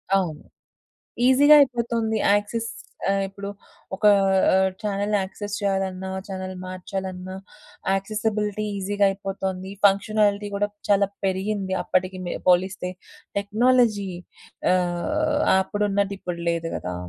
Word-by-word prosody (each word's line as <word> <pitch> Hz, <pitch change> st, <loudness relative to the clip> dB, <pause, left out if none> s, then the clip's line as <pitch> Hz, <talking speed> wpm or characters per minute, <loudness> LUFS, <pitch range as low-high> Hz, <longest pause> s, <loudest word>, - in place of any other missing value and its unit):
అవును. 170 Hz, -6 st, -1 dB, 0.8 s
ఈజీగా 285 Hz, +3 st, +7 dB
అయిపోతుంది 235 Hz, -4 st, +1 dB, 0.2 s
యాక్సెస్ 220 Hz, +2 st, 0 dB, 0.4 s
ఆహ్, 195 Hz, 0 st, +2 dB
ఇప్పుడు 200 Hz, +1 st, -7 dB, 0.5 s
ఒకా 210 Hz, +2 st, +5 dB, 0.4 s
ఆహ్, 190 Hz, 0 st, +3 dB
చానెల్ 205 Hz, 0 st, -1 dB
యాక్సెస్ 205 Hz, +2 st, -5 dB
చేయాలన్నా 190 Hz, -1 st, -1 dB, 0.2 s
చానెల్ 185 Hz, -1 st, -5 dB
మార్చాలన్నా 185 Hz, 0 st, -5 dB, 0.6 s
యాక్సెసిబిలిటీ 210 Hz, +1 st, -1 dB
ఈజీగా 200 Hz, +1 st, 0 dB
అయిపోతోంది. 190 Hz, -1 st, -4 dB
ఫంక్షనాలిటీ 205 Hz, +1 st, +3 dB
కూడా 205 Hz, +1 st, 0 dB, 0.2 s
చాలా 200 Hz, -1 st, +4 dB, 0.2 s
పెరిగింది 190 Hz, 0 st, -1 dB
అప్పటికి 185 Hz, 0 st, 0 dB
మె -, -, -3 dB, 0.2 s
పోలిస్తే. 180 Hz, +1 st, +2 dB, 0.5 s
టెక్నాలజీ 215 Hz, -1 st, +2 dB, 0.6 s
ఆహ్, 290 Hz, -, 0 dB, 0.2 s
అప్పుడున్నదిప్పుడు 200 Hz, -3 st, -2 dB
లేదు 165 Hz, 0 st, -2 dB
కదా! 90 Hz, 0 st, -5 dB
200 Hz, 100 wpm, -24 LUFS, 190-210 Hz, 0.8 s, ఈజీగా